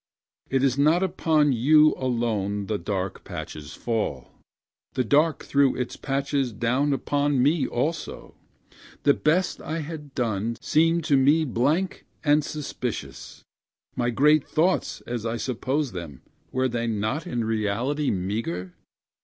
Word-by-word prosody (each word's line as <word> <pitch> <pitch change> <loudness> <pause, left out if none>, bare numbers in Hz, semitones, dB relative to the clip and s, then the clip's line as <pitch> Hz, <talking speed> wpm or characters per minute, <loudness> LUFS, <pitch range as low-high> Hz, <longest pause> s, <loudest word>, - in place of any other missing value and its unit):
It 135 0 +1
is 135 0 +2
not 160 +6 +4
upon 160 -6 +2
you 150 +6 +5
alone 110 -5 -1
the 105 0 -2
dark 95 +1 -3
patches 75 0 -7
fall, 105 - -3 0.6
The 130 - +1
dark 150 +5 +2
threw 140 -1 +3 0.3
patches 135 -2 -1
down 125 +6 0
upon 145 0 +1
me 150 +2 +2
also; 155 +6 -3 0.7
The 140 - +5
best 175 +7 +1
I 160 +1 -3
had 150 -3 -8
done 115 -1 -1
seemed 165 +2 +2
to 145 -3 +3
me 145 +4 +4
blank 150 +9 0 0.2
and 150 0 +4
suspicious; 140 -6 -6 0.5
My 120 -1 0
great 150 +5 +3
thoughts, 175 +4 0
as 120 -2 -5
I 115 +1 -2
supposed 130 +2 -2
them, 80 -8 -8 0.3
were 130 0 +1
they 120 -1 -2
not 110 - -2
in 120 -7 -2
reality 115 +7 0
meagre? 90 -2 -3
130 Hz, 130 wpm, -25 LUFS, 115-150 Hz, 0.7 s, you